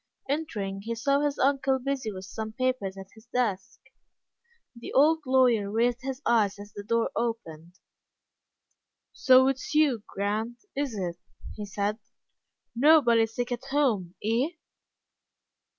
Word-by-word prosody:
Entering, 215 -10 -3
he 230 +3 -4
saw 275 +5 +1
his 290 -1 0
uncle 270 0 +2
busy 260 -3 -3
with 190 -1 -8
some 220 +3 -6
papers 250 -6 -1
at 195 0 -10
his 220 +1 -18
desk. 225 -6 -2 0.9
The 235 - -9
old 310 +4 +5
lawyer 250 -6 +3
raised 235 +3 +1
his 265 +1 -5
eyes 210 -4 +2
as 205 +1 -11
the 205 - -7
door 230 +3 0
opened. 180 -8 -4 1.4
"So 260 0 +5
it's 270 +2 -2
you, 285 -7 +3
Grant, 220 - -3
is 275 -4 -2
it?" 175 -4 -3 0.4
he 210 -1 -7
said. 205 +2 -2 0.8
"Nobody 240 -4 +5
sick 245 +2 -4
at 245 +2 -4
home, 250 -11 0
eh?" 230 +6 +1
235 Hz, 135 wpm, -27 LUFS, 205-265 Hz, 1.4 s, old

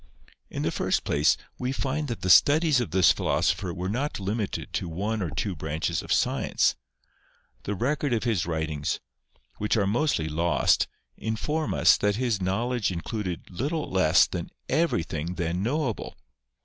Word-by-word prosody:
In - - -4
the - - 0
first - - 0
place, 75 +2 +3 0.2
we 125 +1 -1
find 135 +3 -2
that 120 -3 -5
the 95 - -1
studies 145 - +5
of 120 - -3
this 90 +2 +5
philosopher 90 - 0
were 90 +1 -4
not 125 +8 -2
limited 100 +1 -3
to 90 - -2
one 105 +6 -2
or 90 - -1
two 95 +5 -3
branches 80 0 -2
of - - -8
science. - - +2 0.9
The 105 - -2
record 140 +6 -1
of 115 -2 +1
his 110 -9 0
writings, 80 -3 -2 0.6
which 105 +2 +1
are 100 - +2
mostly 105 - +1
lost, 80 -2 +2 0.3
informs 150 +8 -2
us - - +5
that 105 0 +1
his 115 -4 0
knowledge 110 +4 0
included 90 +1 -4
little 145 - -2
less 95 -4 +5
than - - -5 0.2
everything 85 - 0
then 85 +1 -2
knowable. 125 +1 -2
105 Hz, 155 wpm, -26 LUFS, 85-125 Hz, 0.9 s, studies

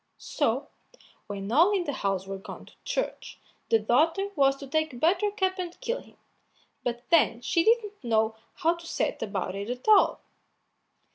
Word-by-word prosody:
So, - - -1 0.6
when 200 0 -5
all 335 - +5
in 365 - -1
the 290 - -3
house 195 -4 -1
were 195 0 -6
gone - - -10
to - - -18
church, - - -4 0.3
the 225 - +5
daughter 320 - +2
was 275 -2 +4
to 275 - -9
take 300 -2 -1
Buttercup 375 - +1
and 355 -1 -5
kill 475 +1 -2
him, - - -20 0.7
but 240 0 -3
then 300 -8 +4
she 335 +6 +1
didn't 420 - +1
know 220 -1 +1 0.2
how 330 +1 +2
to 340 0 -11
set - - -2
about 195 -3 -3
it 200 +3 -5
at 250 +6 -5
all. 425 -2 +5
290 Hz, 165 wpm, -27 LUFS, 225-375 Hz, 0.7 s, all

